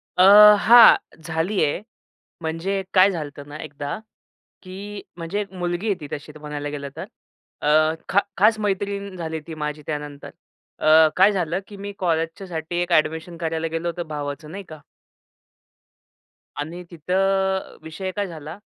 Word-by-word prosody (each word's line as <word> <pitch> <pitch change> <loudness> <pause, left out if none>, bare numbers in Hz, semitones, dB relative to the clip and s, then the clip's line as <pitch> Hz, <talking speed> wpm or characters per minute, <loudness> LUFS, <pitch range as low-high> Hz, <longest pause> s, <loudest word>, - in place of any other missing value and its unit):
अ, 210 +3 +9
हां 235 +2 +9 0.3
झाली 165 +5 0
आहे. 150 +4 0 0.6
म्हणजे 165 +5 -2
काय 185 +1 +6
झालंत 150 -5 -6
ना 145 +1 -8
एकदा 145 -1 -5 0.7
की 200 +2 -8 0.2
म्हणजे 170 +5 -3
एक 200 -2 -7
मुलगी 175 +3 -3
आहे 195 -3 0
ती 150 - -7
तशी 145 +1 -6
तर 155 - -14
म्हणायला 150 -1 -5
गेलं 140 -1 -6
तर. - - -5 0.6
अ, 155 +1 +3 0.2
खा 200 - +4 0.2
खास 215 +3 +4
मैत्रीण 200 -1 -2
झाली 160 -1 -4
ती 165 - -6
माझी 150 0 -4
त्यानंतर. 145 -2 -6 0.5
अ, 155 +1 +6
काय 190 +3 +6
झालं 180 -2 -1
की 205 - -11
मी 200 +1 -6
कॉलेजच्यासाठी 165 0 -2
एक 175 0 -3
एडमिशन 160 +1 +1
करायला 165 -1 -2
गेलो 165 +1 -3
होतो 175 +1 -4
भावाचं, 150 0 -6
नाही 200 +2 -7
का 155 -1 -10 1.8
आणि 165 +5 -6
तिथं 190 +3 +1
अ, - - -16
विषय 185 +4 -5
काय 205 -1 -1
झाला 155 -1 -9
170 Hz, 155 wpm, -23 LUFS, 155-195 Hz, 1.8 s, अ